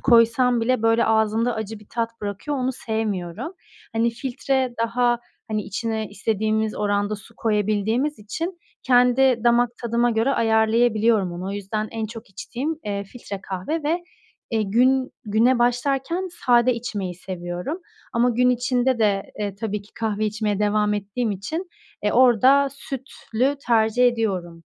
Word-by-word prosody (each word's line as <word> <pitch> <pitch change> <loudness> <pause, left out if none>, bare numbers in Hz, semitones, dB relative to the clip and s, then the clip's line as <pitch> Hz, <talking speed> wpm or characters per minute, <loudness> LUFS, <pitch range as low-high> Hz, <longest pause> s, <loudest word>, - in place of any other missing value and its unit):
koysam 240 0 +4
bile, 250 0 +1
böyle, 225 +1 +4
ağzımda 220 +2 +2
acı 220 0 -5
bir 210 - -17
tat 230 -1 -3
bırakıyor, 205 +8 -3
onu 260 0 0
sevmiyorum. 220 - -3 0.4
Hani, 230 +1 +2
filtre 260 +1 -1
daha, 240 +1 +2 0.3
hani, 215 -1 -1
içine 220 +1 -3
istediğimiz 220 +1 -1
oranda 205 0 0
su 205 - -16
koyabildiğimiz 215 +6 0
için 330 - -5 0.2
kendi 250 -1 +4
damak 240 0 +4
tadıma 235 0 +1
göre 225 +3 +1
ayarlayabiliyorum 220 -3 +3
onu. 175 +2 -5
O - - -3
yüzden 205 +2 -3
en 225 -1 -3
çok 225 -1 -10
içtiğim, 265 - -4
eee, 200 -1 -3
filtre 200 -2 -8
kahve 195 - -3
ve, 335 +4 -1 0.5
eee, 225 -2 +1
gün 255 +6 +2
güne 230 +4 +3
başlarken 270 +9 0 0.2
sade 245 0 +5
içmeyi 205 -6 -4
seviyorum. 180 - -5 0.3
Ama 240 +1 +3
gün 250 +2 +3
içinde 250 0 +1
de, 205 -3 +1
eee, 205 -2 -2
tabii 210 0 -3
ki 205 - -21
kahve 215 -1 -1
içmeye 210 -1 -1
devam 210 0 +2
ettiğim 210 +3 -2
için, 310 - -4 0.3
eee, 210 - +1
orada 260 +3 +5
sütlü 270 -1 -3
tercih 230 +1 +4
ediyorum. 190 -8 -1
225 Hz, 145 wpm, -23 LUFS, 210-250 Hz, 0.5 s, sade